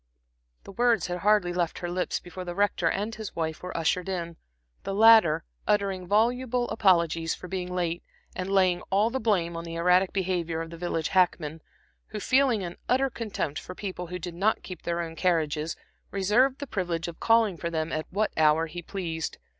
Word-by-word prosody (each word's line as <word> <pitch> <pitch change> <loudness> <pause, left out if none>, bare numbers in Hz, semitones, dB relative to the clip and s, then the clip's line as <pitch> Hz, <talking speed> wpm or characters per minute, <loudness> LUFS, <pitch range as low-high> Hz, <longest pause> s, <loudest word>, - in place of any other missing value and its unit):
The - - -10
words 235 +2 +2
had 180 0 -3
hardly 205 -3 +3
left 175 -2 -1
her 175 - -4
lips 180 0 -1
before 180 +1 -8
the 175 -1 -6
Rector 205 +1 +2
and 210 +3 -2
his 220 -2 -7
wife 160 -1 -3
were 180 -1 -5
ushered 175 +3 0
in, 170 -3 -4 0.4
the 195 - -4
latter 220 -7 +6 0.2
uttering 195 -3 0
voluble 240 +4 +1
apologies 170 -6 +2
for 180 - -10
being 180 -1 -4
late, 175 -1 -1 0.3
and 185 +1 -3
laying 185 -2 +3
all 205 +4 +2
the 265 - -1
blame 185 -7 +1
on 165 - -4
the 165 0 -7
erratic 180 +2 +3
behavior 175 -4 -1
of 165 0 -5
the - - -7
village 165 -2 -2
hackman, 170 -4 +1 0.5
who 215 - -6
feeling 255 -3 +2
an 175 -1 -6
utter 265 +1 +2
contempt 205 -11 -3
for 180 - -9
people 185 -3 -5
who 180 +2 -5
did 175 0 -6
not 195 +6 +1
keep 185 -3 -8
their 170 0 -2
own 165 -1 -6
carriages, 160 -3 0 0.3
reserved 225 +8 +2
the 285 - -5
privilege 175 - -2
of 170 - -8
calling 225 -4 +3
for 170 0 -4
them 160 -1 -2
at 155 0 -3
what 210 +3 0
hour 155 +1 +4
he 175 +2 -7
pleased. 165 -3 -4
180 Hz, 195 wpm, -27 LUFS, 170-205 Hz, 0.5 s, latter